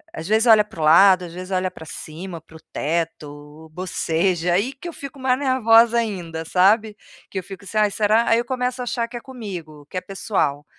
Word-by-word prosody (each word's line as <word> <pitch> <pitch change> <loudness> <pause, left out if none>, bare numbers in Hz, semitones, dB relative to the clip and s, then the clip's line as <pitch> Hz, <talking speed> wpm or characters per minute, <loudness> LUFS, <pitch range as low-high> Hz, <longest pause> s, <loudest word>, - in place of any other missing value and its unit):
às 160 +2 -6
vezes 220 +3 +3
olha 220 -2 +7
para 210 -5 -14
o 155 - -1
lado, 185 +3 +6
às 170 - -10
vezes 185 +1 -8
olha 185 0 0
para 160 - -12
cima, 170 +2 -8
para 160 0 -20
o - - -17
teto, 150 -1 -4
boceja 175 0 0
aí 210 +9 +1
que 275 +6 -10
eu 340 - -6
fico 275 -1 -9
mais 260 0 +1
nervosa 235 -3 +4
ainda, 175 -8 -3
sabe. 210 +5 +3 0.4
Que 190 - -3
eu - - -8
fico 195 +1 -11
assim 215 - -5
ai 210 -1 +4
será? 215 +3 +2
Aí 230 - +5
eu 240 - -1
começo 250 -1 -2
a - - -2
achar 235 -1 -2
que 240 0 -8
é - - -8
comigo, 175 - -9
que - - -6
é - - -1
pessoal. 185 -8 -2
195 Hz, 225 wpm, -22 LUFS, 165-230 Hz, 0.4 s, olha